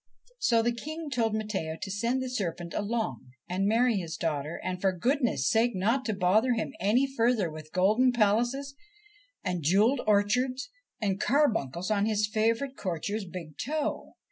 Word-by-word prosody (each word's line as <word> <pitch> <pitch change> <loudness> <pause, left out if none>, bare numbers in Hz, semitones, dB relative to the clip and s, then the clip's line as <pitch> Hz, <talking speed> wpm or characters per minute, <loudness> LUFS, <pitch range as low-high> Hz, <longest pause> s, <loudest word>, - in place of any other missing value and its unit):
So 230 - +3
the 240 - +2
King 310 +5 -6
told 225 -4 +1
Matteo 195 -7 -3
to 195 - -5
send 235 +6 0
the - - -3
serpent 175 -8 -3
along 205 - -3
and 190 +2 0
marry 230 +1 +3
his 165 -3 -4
daughter, 155 -1 -2
and 185 0 -3
for 195 - +3
goodness' 255 - +1
sake 230 0 +2
not 230 +8 +1
to 220 - -1
bother 205 +7 +3
him 225 - -3
any 215 +8 +3
further 235 - +1
with 155 0 -10
golden 215 +8 +3
palaces, 240 +5 +1 0.7
and 180 -2 -2
jewelled 210 - +3
orchards, 250 +6 +1 0.3
and 200 -2 -1
carbuncles 215 - +1
on 205 0 +2
his 210 -1 +2
favourite 230 +5 0
courtier's 200 +3 -3
big 170 -4 -9
toe. 300 +3 -3
215 Hz, 160 wpm, -28 LUFS, 185-245 Hz, 0.7 s, So